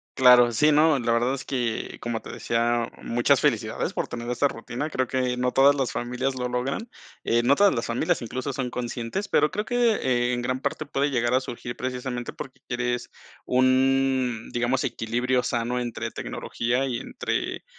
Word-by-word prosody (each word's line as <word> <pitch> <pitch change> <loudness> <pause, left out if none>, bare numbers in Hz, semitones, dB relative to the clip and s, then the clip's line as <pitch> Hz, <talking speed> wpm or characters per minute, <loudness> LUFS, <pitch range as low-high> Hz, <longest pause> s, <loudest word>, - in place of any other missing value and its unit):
Claro. 125 -2 +7
Sí, 150 +7 +4
no, 155 0 +5
la 120 -2 0
verdad 120 +3 +2
es 135 - -4
que, 120 -4 -3
como 120 -1 -3
te - - -9
decía, 115 0 0
muchas 120 +1 +2
felicidades - - 0
por - - -3
tener 120 0 -6
esta 125 +4 +2
rutina. 120 +5 -5
Creo 130 -4 -1
que 125 -1 0
no 125 0 0
todas 140 +3 +5
las 135 -3 -1
familias 125 +2 -2
lo 125 -1 -2
logran, 130 - -3 0.4
eh, 120 +1 +2
no 140 +4 +4
todas 200 -5 +4
las 115 - -2
familias 115 +1 0
incluso 130 +4 -4
son 130 -1 -2
conscientes, 125 - -4
pero 150 - +2
creo 210 +2 -2
que 210 - +1
en 120 - -1
gran 130 +2 -2
parte 140 - -2
puede 140 +1 0
llegar 120 -1 +1
a 130 - +3
surgir 120 -1 -6
precisamente, 125 -1 -4
porque 130 - -9
quieres 120 -1 -2 0.4
un, 130 -2 +2
digamos, 120 +2 0
equilibrio 120 +2 0
sano 120 +1 -1
entre 120 -1 -4
tecnología 125 +3 -2
y 120 -3 -2
entre - - -3
125 Hz, 180 wpm, -25 LUFS, 120-135 Hz, 0.4 s, Claro